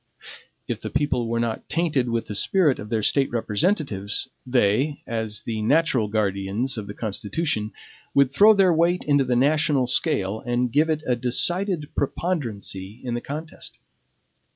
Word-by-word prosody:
If - - -4
the - - -5
people 130 -5 0
were 115 0 -1
not 115 -1 -3
tainted 150 -6 0
with 115 -1 -1
the 105 - -6
spirit 150 - +2
of 105 - -8
their 110 -2 -1
State 135 +5 +2
representatives, 110 - -1 0.2
they, 125 +4 +1
as 110 -2 -3
the 110 -2 -3
natural 135 -2 +2
guardians 105 +4 -1
of 105 -3 -5
the 100 - -8
Constitution, 110 +2 -2 0.4
would 140 -2 +4
throw 210 +9 +6
their 190 -3 +4
weight 170 +2 +2
into 145 -2 +3
the 125 -1 0
national 145 +1 +2
scale 105 -4 +1
and 120 +1 -1
give 155 +5 +2
it 155 -1 -1
a 125 - +1
decided 165 - 0
preponderancy 115 - -3
in 125 -2 -3
the 120 - -2
contest. 155 +3 -7
125 Hz, 155 wpm, -24 LUFS, 110-150 Hz, 0.4 s, throw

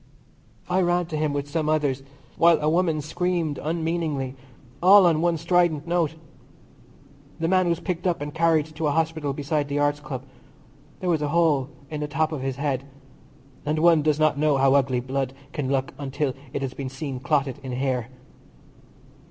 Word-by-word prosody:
I 185 +1 +2
ran 175 0 +2
to 160 - -4
him 155 -1 0
with 145 0 -3
some 155 +1 -1
others, 145 -4 +1 0.3
while 170 0 +5
a 150 - -1
woman 165 -1 +2
screamed 165 0 -1
unmeaningly, 160 -4 -2 0.5
all 190 +2 +8
on 160 -2 +3
one 170 -1 +2
strident 170 -2 +2
note. 170 -2 +1 1.2
The 165 - 0
man 185 0 +3
was 170 - 0
picked 180 -1 -3
up 175 - 0
and 145 0 -5
carried 160 -2 +3
to 155 0 -1
a - - +2
hospital 160 -3 0
beside 145 +1 -1
the 145 0 -2
Arts 145 0 +1
Club. 135 -3 -6 0.8
There 185 - -1
was 160 -3 +1
a 150 - 0
hole 150 -4 +2 0.2
in 150 -1 -4
the 150 - -2
top 155 +2 0
of 150 -4 -4
his 135 -1 -2
head, 140 -1 -1 0.8
and 150 +1 -1
one 165 0 +5
does 150 0 +1
not 155 -2 +2
know 150 -2 +3
how 135 0 +4
ugly 130 -3 +2
blood 130 +1 -2 0.2
can 135 -3 -2
look 135 -1 -1
until 140 0 -2 0.2
it 140 - -3
has 130 -1 -3
been 135 -1 -5
seen 135 -1 -5
clotted 140 -2 0
in 130 -2 -6
hair. 125 -2 -1
150 Hz, 185 wpm, -24 LUFS, 140-165 Hz, 1.2 s, all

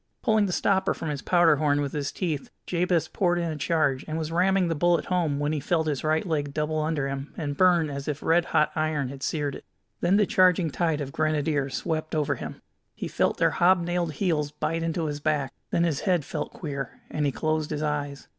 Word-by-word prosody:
Pulling 220 -4 +3
the - - -2
stopper 190 +1 +1
from 160 - -4
his 145 -2 -3
powder 170 -4 +4
horn 145 -1 +2
with 140 -2 -1
his 145 -2 -2
teeth, 160 -7 -3 0.2
Jabez 175 -1 +1
poured 175 -2 +1
in 170 -1 -1
a - - -4
charge, 150 -4 +1
and 155 0 -3
was 160 0 -3
ramming 185 +2 +3
the 165 - 0
bullet 170 +2 +2
home 170 -6 0
when 145 +1 0
he 155 - -1
felt 160 +3 0
his 145 -3 -2
right 155 +2 +1
leg 145 -5 -2
double 155 +1 0
under 155 -3 -1
him 135 +1 -5
and 145 -4 -3
burn 175 -1 +4
as 140 -1 -6
if 150 -1 -3
red 170 +1 +3
hot 155 -2 +2
iron 155 -4 0
had 135 0 -9
seared 145 -1 -1
it. - - -9 0.4
Then 180 +3 +3
the 210 - +4
charging 180 -4 +3
tide 160 -1 0
of 140 -1 -4
Grenadiers 150 -2 0
swept 155 -1 -2
over 150 -2 +1
him. - - -8 0.3
He - - -4
felt - - 0
their - - +3
hobnailed 175 -2 +2
heels 155 -5 0
bite 160 +2 -2
into 165 0 -1
his 145 -1 -3
back; 150 -3 0 0.2
then 170 - +1
his 160 -4 +1
head 180 -7 +1
felt - - -4
queer, 140 -6 -6
and 150 - -1
he - - +1
closed 155 +1 -1
his 150 0 -2
eyes. 145 -2 -3
155 Hz, 220 wpm, -26 LUFS, 145-175 Hz, 0.4 s, powder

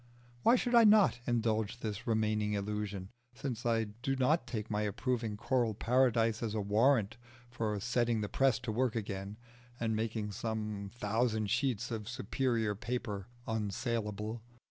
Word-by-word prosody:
Why 235 - +6
should 245 0 0
I 235 -1 +8
not 210 - +6
indulge 110 -2 0
this 105 -1 -4
remaining 110 -2 +1
illusion, 100 -2 -3 0.3
since 120 -3 -3
I 115 -1 +2
do 115 +6 -3
not 140 +6 +2
take 110 -2 -4
my 105 0 0
approving 110 +1 -1
choral 120 -1 +1
paradise 115 -2 +2
as 110 -2 -2
a - - 0
warrant 110 +2 +3 0.3
for 110 -3 -1
setting 120 0 +1
the 105 - -1
press 135 +1 +3
to 115 - -3
work 120 +1 +1
again 100 -2 -4 0.4
and 110 -1 0
making 110 -1 -2
some 105 -2 -3
thousand 110 -2 0
sheets 120 -3 0
of 110 -2 -4
superior 120 -3 0
paper 105 -3 -4 0.2
unsaleable? 110 0 -2
110 Hz, 145 wpm, -33 LUFS, 105-120 Hz, 0.4 s, I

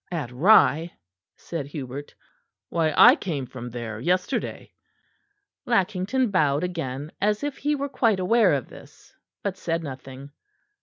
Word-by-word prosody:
"At 150 -8 -3
Rye," 165 - +4 0.4
said 160 -5 -6
Hubert, 140 -1 -7 0.5
"why 160 -2 +1
I 245 +3 +9
came 155 - -4
from 125 -1 -8
there 115 -2 -6
yesterday." 180 - -2 0.9
Lackington 210 +3 +1
bowed 150 -5 +2
again, 155 -5 -4
as 210 +4 +1
if 290 -1 -3
he 295 +1 0
were 280 0 -3
quite 230 -7 +1
aware 195 0 +3
of 135 - -4
this; - - -16 0.3
but 195 -2 -3
said 165 -2 -2
nothing. 135 0 -9
170 Hz, 135 wpm, -25 LUFS, 140-205 Hz, 0.9 s, I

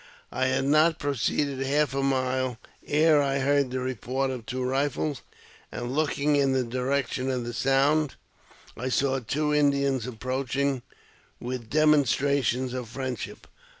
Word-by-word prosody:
I 130 0 0
had 130 +1 0
not 155 +3 +4
proceeded 140 0 -1
half 140 +1 +1
a 135 - 0
mile 130 -2 0 0.3
ere 155 0 +4
I 140 -1 0
heard 140 0 +2
the 130 +1 -3
report 130 +2 -2
of 125 -3 -7
two 130 +1 -3
rifles, 140 +1 -1 0.5
and, 120 +1 -4
looking 150 -1 +1
in 135 -2 +3
the 130 -1 +1
direction 130 +1 -1
of 125 -2 -1
the 120 - -5
sound, 135 +4 +2 0.6
I 125 +2 -3
saw 135 +1 +1
two 150 +5 -1
Indians 140 -4 +2
ap 125 - -6
proaching 130 +1 -1 0.6
with 125 -2 -5
demonstrations 140 -3 +2
of 125 -3 -5
friendship. 130 -2 -5
135 Hz, 145 wpm, -26 LUFS, 130-140 Hz, 0.6 s, not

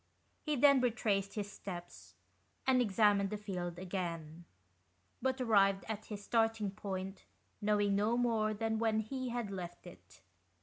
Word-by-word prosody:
He 305 -2 -1
then 280 0 +6
retraced 205 -5 0
his 205 -1 -3
steps, 175 - -9 0.5
and 260 -1 +4
examined 205 -2 +3
the 210 - -3
field 180 -4 -4
again, 170 -3 -4 0.8
but 260 +1 0
arrived 195 -5 +3
at 215 -1 -4
his 205 -2 -7
starting 225 -3 +1
point, 195 -1 -5 0.4
knowing 205 -1 +2
no 220 +4 +2
more 225 -3 +2
than 220 +1 -1
when 220 -1 +2
he 255 +3 -4
had 235 -4 -3
left 175 -2 -6
it. 90 +1 -14
205 Hz, 140 wpm, -34 LUFS, 190-225 Hz, 0.8 s, then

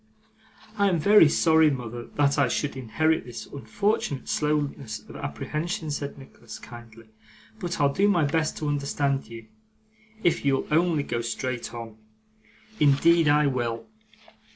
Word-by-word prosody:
'I 200 0 +4
am 180 - +1
very 165 0 +6
sorry, 160 0 +4
mother, 120 -3 -5
that 145 -1 +2
I 140 - +4
should 145 +4 -2
inherit 155 +6 0
this 120 -2 -8
unfortunate 145 -2 -2
slowness 145 -6 -1
of - - -12
apprehension,' 155 - -4
said 145 -1 -4
Nicholas, 125 -4 -12
kindly; 115 -2 -13 0.5
'but 175 -5 -4
I'll 140 -1 +3
do 200 +5 +3
my 175 -6 +3
best 155 +2 0
to 150 - -3
understand 140 -1 -1
you, 115 0 -10 0.8
if 170 - +2
you'll 135 -1 +1
only 165 -1 +2
go 120 -4 -3
straight 120 +2 -4
on: 115 -2 -8 0.8
indeed 160 +3 +4
I 150 +1 +4
will. 120 -4 -2
140 Hz, 140 wpm, -25 LUFS, 120-160 Hz, 0.8 s, very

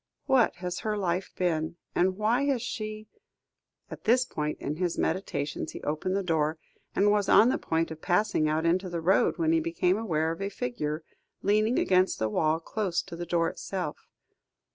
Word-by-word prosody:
What 260 -9 +3
has 180 0 -4
her 215 -1 -2
life 185 -1 -1
been? 160 -3 0 0.2
And 185 +1 +2
why 230 +6 +2
has 270 -5 0
she 215 -1 -5 0.4
" - - -44
At - - -9
this 250 +3 +4
point 150 -7 -3
in 150 +2 -3
his 175 -1 -1
meditations 150 -6 -2
he - - -8
opened 155 +6 -1
the 200 - 0
door, 160 -2 0 0.4
and 205 +1 +4
was 205 -1 +1
on 225 - +7
the - - 0
point 165 0 -1
of 160 0 -8
passing 180 -4 +2
out 155 +2 0
into 180 +3 +1
the 170 -1 -3
road, 185 +4 +3
when 160 -2 +2
he 165 - +4
became 170 +4 +1
aware 160 -7 0
of 165 - -6
a 200 - -1
figure, 150 -1 -3 0.4
leaning 215 +4 +2
against 185 0 +3
the 110 - 0
wall 155 +8 +1
close 185 0 -2
to - - -9
the 175 0 -6
door 165 -1 +2
itself. 180 -3 -5
180 Hz, 190 wpm, -28 LUFS, 160-205 Hz, 0.4 s, on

